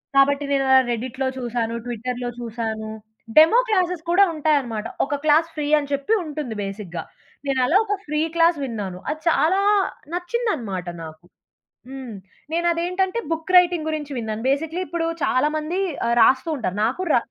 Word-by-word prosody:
కాబట్టి, 280 +1 +4
నేనలా 270 -1 +4
రెడ్డిట్‌లో 260 +3 -2
చూశాను, 235 -2 -2
ట్విట్టర్‌లో 245 +1 -4
చూశాను. 220 -2 -4 0.5
డెమో 325 +10 +8
క్లాసెస్ 365 -5 0
కూడా 380 +3 +6
ఉంటాయనమాట. 280 -8 0 0.2
ఒక 290 - -2
క్లాస్ 315 +2 +4
ఫ్రీ 300 -1 -2
అని 285 -1 -6
చెప్పి 280 +10 0
ఉంటుంది 300 -6 -5
బేసిక్‌గా. 195 -4 -6 0.4
నేనలా 270 +5 +3
ఒక 410 - -1
ఫ్రీ 300 0 -1 0.2
క్లాస్ 335 0 +4
విన్నాను. 205 -8 -4
అది 310 +1 -3
చాలా 335 +4 +3 0.5
నచ్చిందనమాట 345 - -2 0.2
నాకు. 160 +1 -11 0.6
హ్మ్. 265 -4 -7 0.4
నేను 340 +1 0
అదేంటంటే, 365 +5 -1
బుక్ 325 +3 -3
రైటింగ్ 350 -3 +3
గురించి 300 -2 -4
విన్నాను. 220 -2 -3
బేసికల్లీ 320 +5 -1
ఇప్పుడు 335 +1 -2 0.2
చాలామంది 305 +6 0 0.3
ఆహ్, 235 - +2
రాస్తూ 260 +7 +4
ఉంటారు. 190 -7 -3
నాకు 255 +10 -1
ర - - +6
280 Hz, 140 wpm, -22 LUFS, 235-330 Hz, 0.6 s, డెమో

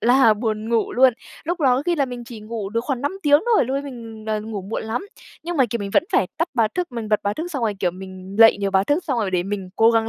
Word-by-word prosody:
là 245 -2 +5
buồn 215 0 -3
ngủ 230 -2 +1
luôn, 255 0 +5 0.3
lúc 345 +2 -2
đó 255 -3 +4
có 270 - -1
khi 350 - +2
là 280 - +2
mình 245 -2 -7
chỉ 230 -2 -10
ngủ 215 -2 -5
được 230 +1 0
khoảng 270 -4 -2
5 285 +7 -1
tiếng 290 0 +5
thôi, - - +4
lúc 260 +3 -2
ấy 280 - -2
mình, 230 -5 -9
ờ, 215 -1 0
ngủ 215 -3 -5
muộn 200 +4 -4
lắm, 235 - -3 0.4
nhưng 345 0 -4
mà, 265 - +5
kiểu, 235 - -1
mình 200 -1 -4
vẫn - - +4
phải 185 - +3
tắt 330 +2 0
báo 225 -3 +3
thức, 355 -7 -2
mình 225 -3 -4
bật 210 - +2
báo 205 +1 -1
thức 335 +3 -4
xong 270 -4 -3
rồi 215 -2 0
kiểu 180 - +2
mình 190 +1 -9
lậy 225 -2 +8
nhiều 200 -1 -1
báo 190 0 +3
thức 295 - 0
xong 265 -7 -1
rồi 200 -4 0
để 180 -1 +1
mình 195 -1 -4
cố 225 +1 +6
gắng 225 -1 +2
230 Hz, 305 wpm, -22 LUFS, 210-265 Hz, 0.4 s, lậy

